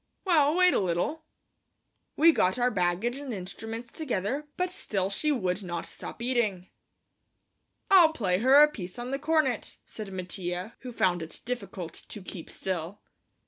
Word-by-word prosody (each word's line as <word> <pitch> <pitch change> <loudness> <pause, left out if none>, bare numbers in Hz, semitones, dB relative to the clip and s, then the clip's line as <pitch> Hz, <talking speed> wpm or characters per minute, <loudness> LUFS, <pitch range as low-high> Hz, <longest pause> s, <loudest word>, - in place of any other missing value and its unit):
"Well, 310 -4 +4
wait 365 0 +5
a - - +3
little." 190 - -1 0.9
We 330 +2 +7
got 190 - +2
our 250 0 +2
baggage 185 +6 0
and 280 -2 -6
instruments 225 +4 -6
together, 275 - -2
but 365 0 0
still 195 - -2
she 300 +9 +1
would 185 -7 0
not 175 -3 -4
stop 235 - -8
eating. 215 -8 0 1.2
"I'll 350 -5 +8
play 190 -11 0
her 265 +6 +7
a - - +7
piece 185 -11 -8
on 245 +1 -5
the 275 - -1
cornet," 300 -6 0
said 210 -3 -8
Mattia, 185 +2 -4
who 255 - -7
found 180 -6 +1
it 160 - -6
difficult 200 -8 -5
to 210 - -9
keep 185 -2 -8
still. 185 +1 -4
225 Hz, 155 wpm, -28 LUFS, 185-280 Hz, 1.2 s, I'll